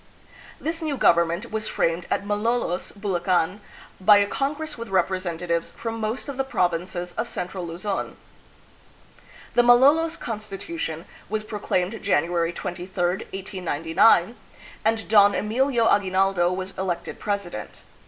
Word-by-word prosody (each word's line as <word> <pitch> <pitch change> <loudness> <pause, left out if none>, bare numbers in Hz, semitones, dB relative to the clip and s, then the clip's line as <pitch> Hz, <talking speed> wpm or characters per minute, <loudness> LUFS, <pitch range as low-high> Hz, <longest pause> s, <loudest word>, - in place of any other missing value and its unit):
This 325 +2 -3
new 305 -4 -2
government 170 -3 +2
was 215 0 -2
framed 165 +1 0
at 200 - -1
Malolos, 210 -2 -1
Bulacan, 185 -2 0 0.4
by 205 +2 +7
a 205 - +4
congress 295 +7 -3
with 230 -1 -7
representatives 175 -2 -1
from 225 -1 -5
most 220 +5 -3
of 280 -2 -5
the 270 - +1
provinces 180 -5 -1
of - - -1
central 180 0 -5
Luzon. 185 +4 -4 1.4
The 240 - +5
"Malolos 280 +7 +5
Constitution" 210 - -5 0.2
was 215 +1 -2
proclaimed 210 -1 -2
January 170 -2 +1
23, 175 +1 -6
1899, 180 +1 +1 0.5
and 220 0 0
Don 205 -2 +6
Emilio 240 +2 +1
Agui 195 -2 +2
naldo 185 -2 +2
was 185 +1 -4
elected 185 -3 -3
president. 195 - -4
195 Hz, 125 wpm, -24 LUFS, 175-225 Hz, 1.4 s, by